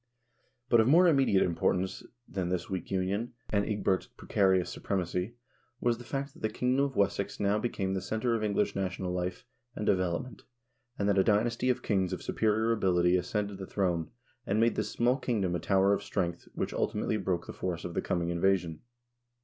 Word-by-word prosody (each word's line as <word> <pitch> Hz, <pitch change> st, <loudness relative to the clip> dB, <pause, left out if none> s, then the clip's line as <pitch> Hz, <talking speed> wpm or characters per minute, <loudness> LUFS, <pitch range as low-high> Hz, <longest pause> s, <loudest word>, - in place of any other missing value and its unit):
But 120 Hz, -2 st, +5 dB
of 110 Hz, -, +4 dB
more 170 Hz, +6 st, +6 dB
immediate 135 Hz, -, +4 dB
importance 90 Hz, +2 st, 0 dB, 0.3 s
than 90 Hz, -3 st, -3 dB
this 90 Hz, +1 st, -2 dB
weak 95 Hz, -, -3 dB
union, 100 Hz, +6 st, -1 dB, 0.2 s
and 100 Hz, -1 st, +2 dB
Ecgbert's 100 Hz, -3 st, 0 dB
precarious 95 Hz, -2 st, +1 dB
supremacy, 90 Hz, +3 st, -2 dB, 0.4 s
was 120 Hz, -1 st, +1 dB
the -, -, -9 dB
fact 140 Hz, +3 st, -4 dB
that -, -, -16 dB
the 110 Hz, -, 0 dB
kingdom 125 Hz, +5 st, +1 dB
of 140 Hz, -2 st, -2 dB
Wessex 100 Hz, 0 st, 0 dB
now 105 Hz, +1 st, +2 dB
became 100 Hz, -4 st, -2 dB
the 95 Hz, -, -1 dB
center 110 Hz, +4 st, -1 dB
of 115 Hz, -2 st, 0 dB
English 100 Hz, -1 st, 0 dB
national 95 Hz, -1 st, -2 dB
life 90 Hz, 0 st, -3 dB, 0.3 s
and 105 Hz, -, -3 dB
develop 90 Hz, -4 st, +1 dB
ment, 125 Hz, -6 st, -12 dB, 0.6 s
and 100 Hz, -, 0 dB
that 100 Hz, -1 st, +3 dB
a -, -, +5 dB
dynasty 115 Hz, +4 st, +2 dB
of 125 Hz, 0 st, 0 dB
kings 95 Hz, -3 st, +1 dB
of 90 Hz, -, -5 dB
superior 110 Hz, +1 st, +1 dB
ability 90 Hz, -5 st, +3 dB
ascended 100 Hz, +2 st, -2 dB
the 95 Hz, -, -6 dB
throne, 90 Hz, -5 st, -1 dB, 0.4 s
and 105 Hz, +2 st, +1 dB
made 115 Hz, +1 st, +4 dB
this -, -, -2 dB
small 120 Hz, +2 st, +2 dB
kingdom 105 Hz, -10 st, -1 dB
a 90 Hz, -, 0 dB
tower 95 Hz, +1 st, +3 dB
of -, -, 0 dB
strength 85 Hz, -1 st, -3 dB
which -, -, -2 dB
ulti -, -, -1 dB
mately 105 Hz, -1 st, -1 dB
broke 90 Hz, -2 st, -1 dB
the -, -, -7 dB
force 90 Hz, -2 st, -4 dB
of 85 Hz, -, -5 dB
the -, -, 0 dB
coming 85 Hz, -1 st, -1 dB
invasion. 85 Hz, -2 st, +1 dB
100 Hz, 195 wpm, -30 LUFS, 90-110 Hz, 0.6 s, more